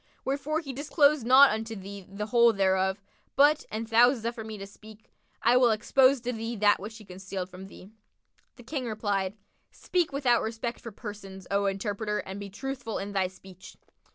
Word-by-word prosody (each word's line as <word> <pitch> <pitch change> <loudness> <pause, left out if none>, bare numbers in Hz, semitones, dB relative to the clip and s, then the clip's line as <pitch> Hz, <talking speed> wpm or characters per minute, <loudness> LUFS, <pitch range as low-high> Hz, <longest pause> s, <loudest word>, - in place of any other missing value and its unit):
Wherefore 285 +4 -1
he 275 -5 -7
disclosed 285 -1 +2
not 265 +2 +8
unto 220 +1 -4
thee 195 -1 -9
the 200 +2 -5
whole 235 +1 +4
thereof; 190 0 +1 0.4
but, 295 +2 +4
an 220 +1 -3
thou 230 +2 +5
suffer 230 -1 -5
me 220 -1 -7
to 195 - -7
speak, 215 +2 -16 0.3
I 240 - +5
will 250 -1 +5
expose 260 +5 +3
to 245 +1 -3
thee 225 +1 -4
that 205 -1 +3
which 215 +3 -8
he 215 - -14
concealed 190 0 -6
from 185 +1 -10
thee." 195 +1 -14 0.6
The 245 - -14
King 255 0 -4
replied, 205 -2 -2 0.3
"Speak 355 -4 -1
without 265 -4 +2
respect 230 +2 -4
for 230 - -8
persons, 195 -3 -9
O 200 0 +1
interpreter, 205 +2 -2
and 190 0 -6
be 200 0 -7
truthful 245 +1 -5
in 200 +1 -5
thy 190 -2 +1
speech." 185 0 -14
220 Hz, 180 wpm, -28 LUFS, 195-245 Hz, 0.6 s, not